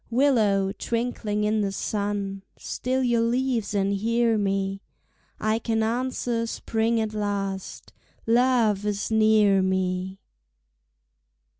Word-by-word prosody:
Willow, 220 -7 +2
twinkling 225 -1 -2
in 215 0 +1
the 200 -1 -1
sun, 200 -1 -3 0.2
Still 260 +1 -2
your 240 -2 +2
leaves 235 -3 0
and 200 0 +1
hear 230 +3 +1
me, 195 -1 -1 0.6
I 215 +1 0
can 225 -1 0
answer 235 0 -1
spring 225 0 -1
at 220 -1 -2
last, 200 -2 -4 0.3
Love 230 -4 +3
is 210 +1 -2
near 215 -3 +4
me! 185 0 -1
215 Hz, 110 wpm, -25 LUFS, 195-230 Hz, 0.6 s, near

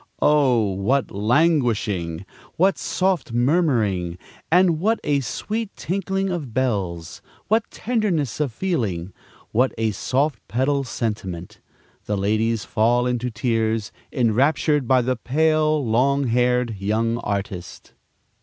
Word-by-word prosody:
Oh, 130 -8 +3
what 125 +9 0
languishing! 105 - +1 0.3
what 190 +3 +2
soft 185 -9 -1
murmuring, 120 - +1 0.3
and 175 -2 +4
what 220 +6 +1
a 145 -1 +1
sweet 210 - -4
tinkling 195 +1 -2
of 145 -10 -5
bells! 95 -11 -2 0.3
what 220 +1 +2
tenderness 195 - -1
of 145 -4 0
feeling! 110 - -2 0.4
what 125 +4 +2
a 110 -1 +1
soft 130 +4 0
pedal 135 +3 0
sentiment! 105 -8 -4 0.5
The 105 - -1
ladies 110 +3 0
fall 120 +2 +2
into 125 0 -1
tears, 110 -2 -1 0.2
enraptured 135 +3 +2
by 130 -1 +4
the 130 +1 0
pale, 155 +2 +1
long 135 +5 +2
haired 125 -1 +1
young 115 +4 0
artist. 100 -4 -5
125 Hz, 115 wpm, -22 LUFS, 110-150 Hz, 0.5 s, and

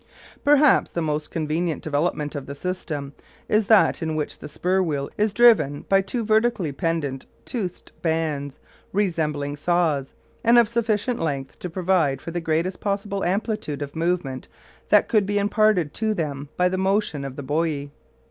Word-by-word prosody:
Perhaps 290 -1 +5
the 170 - -3
most 150 -1 -2
convenient 160 +1 -2
development 150 0 -1
of 140 -3 -6
the 140 - -6
system 150 -4 -4 0.3
is 215 -1 +2
that 220 -4 +5
in 160 -1 -2
which 150 -1 -3
the 150 - -8
spur 185 +5 0
wheel 145 -6 -2
is 210 0 +1
driven 205 -11 +4
by 195 0 +5
two 225 +4 -3
vertically 220 -6 +2
pendant 140 -3 -2 0.2
toothed 190 -8 -5
bands, 155 -4 -1 0.3
resembling 155 -7 0
saws, 155 -3 0 0.3
and 235 +1 +5
of 235 -2 +6
sufficient 230 +1 0
length 140 -4 -3
to 180 - -5
provide 170 -6 +1
for 165 - -7
the 175 +1 -3
greatest 165 +3 -1
possible 200 -1 -2
amplitude 190 -6 -1
of 140 - -8
movement 165 -6 -1 0.4
that - - +5
could 210 -4 +2
be 205 0 0
imparted 205 -6 +2
to 220 -1 -1
them 145 -4 -3
by 180 - +4
the 185 +1 -1
motion 190 -6 0
of 135 -1 -6
the 145 - -6
buoy. 145 0 -1
170 Hz, 165 wpm, -24 LUFS, 145-205 Hz, 0.4 s, of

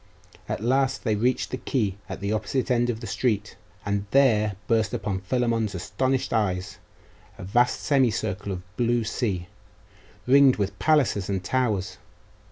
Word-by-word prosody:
At - - -3
last 130 +2 +1
they 110 - +1
reached 125 +5 0
the 130 - -2
quay 105 -9 -1
at - - -6
the 100 +2 -1
opposite 115 +4 -1
end 120 0 +2
of 115 -1 -3
the - - -6
street; 105 -4 -1 0.3
and 100 0 -1
there 110 -6 +3
burst 110 -3 +1
on 95 -2 -2
Philammon's 115 -1 0
astonished 130 +10 -1
eyes 95 -5 -1 0.6
a 95 - -9
vast 120 +7 +2
semicircle 115 -7 +1
of 90 +1 -8
blue 120 -1 +1
sea, 105 -5 -2 0.8
ringed 135 0 +6
with 100 -2 -3
palaces 115 -7 +2
and 95 -2 -1
towers.... 110 -7 -1
110 Hz, 150 wpm, -25 LUFS, 100-125 Hz, 0.8 s, ringed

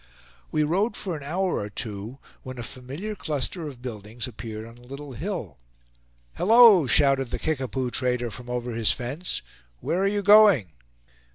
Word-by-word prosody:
We 155 - +2
rode 195 +8 +1
for 180 -4 -3
an 150 - -7
hour 180 +6 -1
or 105 - -4
two 105 +3 -6 0.2
when 130 0 -8
a 120 - -5
familiar 135 - -6
cluster 155 -2 -3
of 130 -4 -10
buildings 110 -1 -6
appeared 110 -2 -7
on 115 +1 -14
a - - -17
little 140 +3 -9
hill. 155 - -5 0.7
"Hallo!" 220 - +7
shouted 135 0 +3
the - - -3
Kickapoo 130 -4 -2
trader 125 -2 0
from 120 +3 -10
over 125 0 -3
his 115 -1 +2
fence. 140 +9 -3 0.4
"Where 175 - -1
are 195 - +2
you 205 0 0
going?" 205 - +6
130 Hz, 165 wpm, -25 LUFS, 120-175 Hz, 0.7 s, Hallo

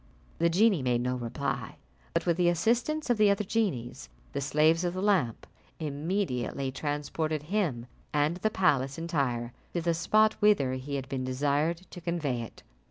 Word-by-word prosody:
The 170 - +4
genie 195 -1 +4
made 125 -2 +1
no 125 +1 0
reply, 125 0 -3 0.4
but 170 - +1
with 170 -2 +2
the 175 -1 +4
assistance 245 - +1
of 240 - +2
the 210 -1 +6
other 200 +1 +2
genies, 185 - -2 0.2
the - - -2
slaves 155 +5 +3
of 175 0 -1
the 185 - -2
lamp, 180 - +1 0.3
immediately 145 - -2
transported 150 +2 -2
him 150 - 0 0.3
and 150 +3 +1
the 215 +4 +1
palace, 140 -10 +1
entire, 135 -8 -1 0.2
to 175 - +1
the 170 0 +1
spot 215 +6 +3
whither 200 -12 +4
he 130 +2 -4
had 135 -1 -4
been 130 -1 -3
desired 145 +6 0
to 175 - -9
convey 155 -8 -1
it. 115 - -10
155 Hz, 165 wpm, -29 LUFS, 130-180 Hz, 0.4 s, the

